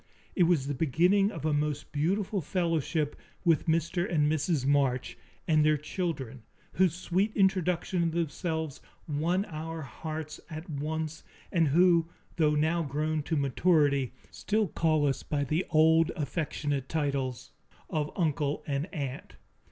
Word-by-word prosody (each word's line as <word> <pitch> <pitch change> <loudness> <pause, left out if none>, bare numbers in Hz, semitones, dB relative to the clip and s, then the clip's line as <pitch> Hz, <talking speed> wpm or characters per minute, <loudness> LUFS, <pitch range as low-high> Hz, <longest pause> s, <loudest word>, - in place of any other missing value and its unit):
It 180 - +5
was 165 -6 +2
the 145 - -2
beginning 175 +8 +3
of 185 - -6
a 155 - +2
most 150 0 -1
beautiful 185 +6 0
fellowship 165 -2 -1 0.3
with 165 -2 +3
Mr. 170 +2 0
and 150 -3 +3
Mrs. 155 -2 0
March 135 -3 +1 0.3
and 155 -2 +4
their 155 0 +4
children, 150 -5 -4 0.3
whose 180 -3 +3
sweet 185 +3 0
introduction 185 -2 +1
of 165 -1 +1
themselves 160 -2 -2 0.3
won 170 +6 0
our 160 -1 -6
hearts 155 +4 -6
at 160 +2 -7
once 155 +1 -4 0.3
and 165 -3 +3
who, 170 +2 +4 0.3
though 150 -2 +3
now 160 +3 +2
grown 155 +1 -1
to 150 +3 -2
maturity, 140 -2 +2 0.2
still 210 -2 0
call 155 -1 +2
us 135 -2 0
by 145 -1 -1
the 155 +6 -1
old, 160 +1 +4
affectionate 145 -3 -2
titles 135 -4 -2 0.4
of 155 -3 -1
uncle 150 -3 0
and 145 +4 -2
aunt. 140 -6 -5
155 Hz, 140 wpm, -29 LUFS, 145-170 Hz, 0.4 s, It